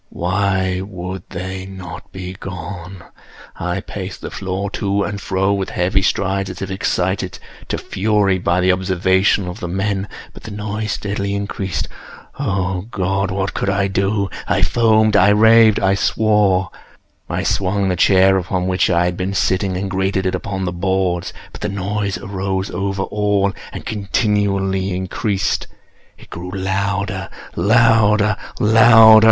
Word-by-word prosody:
Why 95 Hz, 0 st, 0 dB
would 95 Hz, -2 st, -7 dB
they 95 Hz, +1 st, -5 dB
not 95 Hz, -1 st, -9 dB
be 90 Hz, -1 st, -6 dB
gone? 90 Hz, 0 st, -8 dB, 0.5 s
I -, -, -3 dB
paced -, -, -7 dB
the -, -, -6 dB
floor 95 Hz, +1 st, -3 dB
to 100 Hz, -1 st, 0 dB
and 100 Hz, 0 st, -4 dB
fro 95 Hz, +1 st, 0 dB
with 95 Hz, -1 st, -2 dB
heavy 95 Hz, +2 st, +1 dB
strides, 95 Hz, 0 st, 0 dB
as 95 Hz, -, -7 dB
if 95 Hz, -1 st, -5 dB
excited 95 Hz, -1 st, -1 dB, 0.3 s
to -, -, -2 dB
fury 100 Hz, -2 st, +1 dB
by 90 Hz, 0 st, +1 dB
the 95 Hz, +1 st, +4 dB
observations 95 Hz, +1 st, +2 dB
of 90 Hz, +4 st, -6 dB
the 90 Hz, -, -4 dB
men—but 95 Hz, +2 st, -4 dB
the -, -, -9 dB
noise 105 Hz, 0 st, -3 dB
steadily 100 Hz, -1 st, -3 dB
increased. 100 Hz, -3 st, -3 dB, 0.5 s
Oh 95 Hz, 0 st, -1 dB
God! 95 Hz, -1 st, -1 dB
what 95 Hz, 0 st, -2 dB
could -, -, -1 dB
I 100 Hz, 0 st, +1 dB
do? 100 Hz, +1 st, 0 dB, 0.2 s
I -, -, +1 dB
foamed—I 110 Hz, -3 st, +4 dB
raved—I 110 Hz, -2 st, +5 dB
swore! 100 Hz, -3 st, +2 dB, 0.6 s
I -, -, -2 dB
swung 100 Hz, +1 st, 0 dB
the 90 Hz, -, +1 dB
chair 95 Hz, +1 st, +4 dB
upon 90 Hz, 0 st, -2 dB
which 90 Hz, 0 st, +1 dB
I 85 Hz, -1 st, +3 dB
had 90 Hz, 0 st, -1 dB
been 95 Hz, +2 st, -3 dB
sitting, 95 Hz, 0 st, +1 dB
and 100 Hz, +1 st, -2 dB
grated 95 Hz, 0 st, -1 dB
it 95 Hz, -, 0 dB
upon 95 Hz, -1 st, -3 dB
the 90 Hz, -, -1 dB
boards, 90 Hz, -1 st, -1 dB, 0.2 s
but -, -, -11 dB
the -, -, -1 dB
noise 100 Hz, 0 st, -2 dB
arose 95 Hz, 0 st, -3 dB
over 95 Hz, +2 st, -2 dB
all 105 Hz, -1 st, 0 dB, 0.2 s
and -, -, -8 dB
continually 100 Hz, -2 st, 0 dB
increased. 95 Hz, +2 st, -1 dB, 0.5 s
It -, -, -17 dB
grew 90 Hz, +2 st, -6 dB
louder—louder—louder! 100 Hz, +3 st, +1 dB
95 Hz, 140 wpm, -19 LUFS, 95-100 Hz, 0.6 s, raved—I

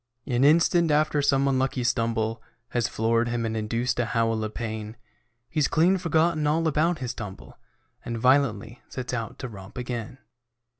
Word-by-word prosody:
An 125 Hz, 0 st, +1 dB
instant 165 Hz, +3 st, +4 dB
after 150 Hz, 0 st, +2 dB
some 140 Hz, -1 st, +2 dB
unlucky 130 Hz, -1 st, 0 dB
stumble 115 Hz, -2 st, 0 dB, 0.3 s
Has 120 Hz, -1 st, 0 dB
floored 115 Hz, +1 st, +1 dB
him 120 Hz, -1 st, -1 dB
and 110 Hz, 0 st, -2 dB
induced 115 Hz, +4 st, -1 dB
a 120 Hz, -, +2 dB
howl 115 Hz, -1 st, 0 dB
of 110 Hz, 0 st, -5 dB
pain, 110 Hz, -1 st, -5 dB, 0.5 s
He's 155 Hz, -1 st, +1 dB
clean 180 Hz, +4 st, +3 dB
forgotten 160 Hz, -2 st, +1 dB
all 160 Hz, +2 st, +2 dB
about 160 Hz, +3 st, +2 dB
his 125 Hz, -3 st, -4 dB
tumble 105 Hz, -5 st, -9 dB, 0.4 s
And 120 Hz, -1 st, -4 dB
violently 125 Hz, -2 st, +2 dB
sets 125 Hz, -1 st, -5 dB
out 115 Hz, -3 st, -4 dB
to 130 Hz, -, -5 dB
romp 100 Hz, 0 st, -11 dB
again. 125 Hz, +1 st, -5 dB
125 Hz, 160 wpm, -26 LUFS, 115-150 Hz, 0.5 s, instant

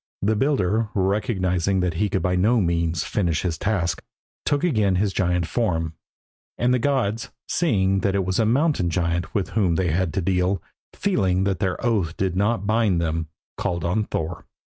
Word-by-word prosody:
The 110 Hz, +2 st, +2 dB
builder, 110 Hz, -4 st, +1 dB
recognising 95 Hz, -2 st, +1 dB
that 90 Hz, -2 st, 0 dB
he 105 Hz, +5 st, 0 dB
could 95 Hz, -, -1 dB
by 90 Hz, -1 st, +1 dB
no 110 Hz, +7 st, +3 dB
means 85 Hz, -2 st, 0 dB
finish 85 Hz, -7 st, -1 dB
his 85 Hz, -4 st, -2 dB
task, 100 Hz, -5 st, 0 dB, 0.4 s
took 145 Hz, -1 st, +1 dB
again 110 Hz, -, +2 dB
his 100 Hz, +1 st, +1 dB
giant 90 Hz, -2 st, +1 dB
form; 80 Hz, -5 st, -1 dB, 0.6 s
and 125 Hz, +1 st, +2 dB
the 125 Hz, -, +2 dB
gods, 115 Hz, -4 st, 0 dB, 0.2 s
seeing 95 Hz, -, +1 dB
that 100 Hz, 0 st, 0 dB
it 95 Hz, -2 st, +1 dB
was 95 Hz, +3 st, 0 dB
a 115 Hz, -, +3 dB
mountain 135 Hz, -, +2 dB
giant 85 Hz, 0 st, -1 dB
with 100 Hz, -3 st, 0 dB
whom 95 Hz, -6 st, +1 dB
they 90 Hz, -2 st, +1 dB
had 90 Hz, +1 st, 0 dB
to 95 Hz, -, +1 dB
deal, 90 Hz, +1 st, +1 dB, 0.4 s
feeling 95 Hz, -, +1 dB
that 95 Hz, -3 st, 0 dB
their 95 Hz, -2 st, 0 dB
oath 100 Hz, -9 st, 0 dB
did 95 Hz, -2 st, -1 dB
not 100 Hz, +1 st, +1 dB
bind 110 Hz, -4 st, +2 dB
them, 80 Hz, -1 st, -1 dB, 0.3 s
called 85 Hz, -1 st, -2 dB
on 105 Hz, +5 st, +1 dB
Thor. 80 Hz, -5 st, -4 dB
95 Hz, 180 wpm, -23 LUFS, 90-110 Hz, 0.6 s, no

